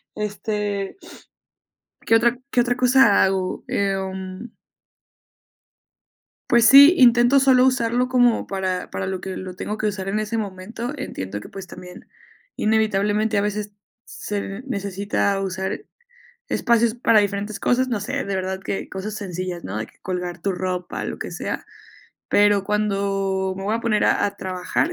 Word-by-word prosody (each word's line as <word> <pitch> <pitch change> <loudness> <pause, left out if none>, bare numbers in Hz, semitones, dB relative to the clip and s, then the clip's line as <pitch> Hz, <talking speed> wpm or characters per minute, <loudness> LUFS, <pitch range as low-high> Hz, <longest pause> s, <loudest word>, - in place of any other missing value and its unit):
Este 205 - -3 1.1
¿qué 225 - +4
otra 235 +1 +3
qué 245 - +3
otra 245 0 0
cosa 250 -3 +5
hago?, 190 -1 -1
em 190 +1 -3 2.0
Pues 235 -1 +5
sí, 285 +8 +9
intento 240 +2 +6
solo 260 -2 +5
usarlo 250 -1 +1
como 245 -2 +3
para 190 -2 -2
para 190 - -4
lo 190 -1 -4
que 190 -1 -5
lo 185 -1 -7
tengo 210 +3 -5
que 215 - -3
usar 195 -2 -2
en 205 +2 -1
ese 215 +2 -2
momento, 215 +6 -5
entiendo 100 - -5
que, - - -11
pues, 195 -1 -9
también 180 0 -12 0.5
inevitablemente 215 0 +1
a - - +3
veces 210 0 -3 0.3
se 205 +2 -5
necesita 200 -3 -1
usar, 190 - -3 0.6
espacios 235 -1 +2
para 230 -3 +4
diferentes 200 +1 -3
cosas, 255 +1 +2
no 225 -5 -2
sé, 275 +5 -3
de 200 -1 -2
verdad 190 0 -3
que 195 - -4
cosas 195 +3 -5
sencillas, 185 -3 -5
¿no?, 100 +3 -5
de 110 - -3
que - - -24
colgar 180 -2 -4
tu 200 - 0
ropa, 180 -1 -3
lo - - -5
que - - -5
sea, - - -4 0.6
pero 205 -1 +4
cuando 195 -2 -1
me 195 - -6
voy 210 +3 0
a 230 - -1
poner 215 -3 +1
a - - +2
a 200 0 -2
trabajar 185 - -2
205 Hz, 155 wpm, -22 LUFS, 190-230 Hz, 2.0 s, sí